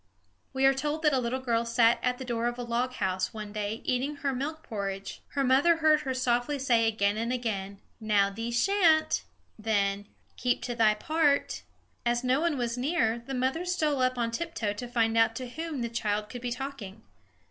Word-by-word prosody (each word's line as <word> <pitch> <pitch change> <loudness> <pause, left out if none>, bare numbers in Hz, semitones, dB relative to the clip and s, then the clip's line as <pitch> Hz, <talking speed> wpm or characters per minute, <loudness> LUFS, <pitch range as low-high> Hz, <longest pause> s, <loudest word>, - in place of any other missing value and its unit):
We 265 0 +1
are 270 - +6
told 295 +4 -2
that 300 -2 +4
a 265 - +3
little 250 +1 -2
girl 235 -2 +1
sat 230 0 +3
at 250 0 0
the 260 - -7
door 235 -1 -1
of 240 0 -3
a 245 - -4
log 240 +2 -1
house, 185 -2 -2
one 210 -1 -6
day, 210 +1 -3
eating 260 +4 -1
her 280 -1 -2
milk 305 +5 -4
porridge. 195 -2 -5
Her 280 - +1
mother 270 +6 +4
heard 310 -1 +4
her 270 -3 -3
softly 255 +2 0
say 240 -4 +2
again 205 -2 +1
and 230 +2 -1
again: 200 -6 -3 0.2
"Now, 205 -3 +2
thee 225 +3 -4
sha'n't;" 320 - +3 0.4
then, 205 -2 0 0.3
"Keep 245 0 0
to 245 - -3
thy 220 -2 +4
part." 305 +3 +1 0.4
As 240 +1 0
no 255 +3 +2
one 335 -4 +1
was 240 -1 -2
near, 250 -5 +1
the 265 +3 -6
mother 260 +7 0
stole 310 -6 0
up 255 0 +1
on 230 -1 0
tiptoe 230 -7 -2
to 245 +4 -6
find 230 -2 +1
out 225 0 +3
to 255 +1 -5
whom 310 +2 -5
the - - -1
child 210 -2 -2
could 245 - -7
be 245 0 -3
talking. 235 -5 -6
245 Hz, 200 wpm, -28 LUFS, 225-275 Hz, 0.4 s, are